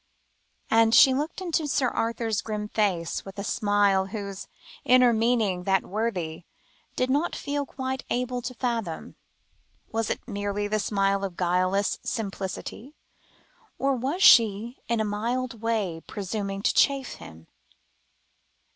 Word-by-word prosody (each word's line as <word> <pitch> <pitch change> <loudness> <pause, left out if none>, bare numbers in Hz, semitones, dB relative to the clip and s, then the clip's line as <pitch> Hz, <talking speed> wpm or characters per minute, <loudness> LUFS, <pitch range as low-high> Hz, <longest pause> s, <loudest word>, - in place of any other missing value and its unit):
and 225 0 +5
she 265 - +8
looked 300 +7 -3
into 330 -4 -1
Sir 270 -3 +1
Arthur's 225 -2 -1
grim 210 -1 -4
face, 190 -7 0
with 195 +1 -11
a 200 - -3
smile 205 -2 +2
whose 200 -1 -6 0.4
inner 250 -1 +5
meaning 220 -5 +1
that 195 -1 +2
worthy 180 -6 -3 0.5
did 255 - +1
not 295 +5 +1
feel 285 0 -3
quite 260 0 -4
able 250 0 -1
to 250 +1 -6
fathom. 230 -9 -3 0.8
Was 225 -1 -1
it - - -4
merely 205 -1 -2
the 215 +1 0
smile 195 -1 +1
of 190 -3 -4
guileless 185 +3 +1
simplicity, 215 +5 -5 0.8
or 275 0 +1
was 275 +10 -1
she, 225 +2 +5
in 235 -1 0
a 220 - +1
mild 230 +3 -2
way, 210 -8 -1
presuming 200 0 -4
to - - +2
chaff 275 -2 +2
him? 80 0 -12
220 Hz, 135 wpm, -26 LUFS, 195-250 Hz, 0.8 s, she